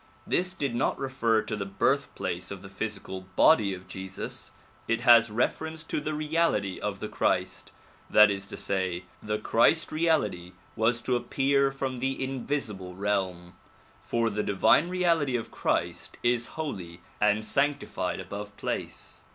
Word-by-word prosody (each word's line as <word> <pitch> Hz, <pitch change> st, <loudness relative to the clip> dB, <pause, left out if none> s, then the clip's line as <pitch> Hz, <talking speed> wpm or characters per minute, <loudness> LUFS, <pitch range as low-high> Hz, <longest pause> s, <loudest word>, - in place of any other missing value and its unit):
This 185 Hz, +1 st, 0 dB
did 140 Hz, -8 st, -2 dB
not 120 Hz, -, 0 dB
refer 120 Hz, -5 st, +1 dB
to 110 Hz, -, -3 dB
the 105 Hz, -, -3 dB
birthplace 100 Hz, -5 st, -1 dB
of 100 Hz, -1 st, -7 dB
the 95 Hz, -, -9 dB
physical 95 Hz, -3 st, -5 dB
body 105 Hz, -11 st, +5 dB
of 95 Hz, 0 st, -13 dB
Jesus. 95 Hz, 0 st, -5 dB, 0.4 s
It 115 Hz, 0 st, +1 dB
has 120 Hz, -2 st, +7 dB
reference 160 Hz, +8 st, -1 dB
to 160 Hz, -, -3 dB
the 155 Hz, +1 st, -3 dB
reality 150 Hz, -, 0 dB
of -, -, -3 dB
the -, -, -2 dB
Christ; -, -, -1 dB, 0.4 s
that 105 Hz, -1 st, +7 dB
is 100 Hz, 0 st, -4 dB
to -, -, -7 dB
say, 95 Hz, -2 st, -1 dB, 0.2 s
the 105 Hz, 0 st, -2 dB
Christ 115 Hz, +9 st, +3 dB
reality 125 Hz, -, 0 dB, 0.2 s
was 115 Hz, +2 st, +2 dB
to 125 Hz, -, 0 dB
appear 135 Hz, +3 st, +2 dB
from 135 Hz, -2 st, -4 dB
the 135 Hz, +1 st, -1 dB
invisible 120 Hz, -9 st, -3 dB
realm, 95 Hz, -3 st, -2 dB, 0.5 s
for 115 Hz, -1 st, 0 dB
the 105 Hz, +1 st, -1 dB
divine 105 Hz, -, +3 dB
reality 170 Hz, -7 st, +2 dB
of 115 Hz, -, -3 dB
Christ 85 Hz, 0 st, -2 dB
is 120 Hz, -1 st, +2 dB
holy 90 Hz, -, -5 dB, 0.2 s
and 105 Hz, +1 st, +3 dB
sanctified 145 Hz, +3 st, 0 dB
above 100 Hz, 0 st, -7 dB
place. -, -, -5 dB
115 Hz, 150 wpm, -28 LUFS, 100-140 Hz, 0.5 s, has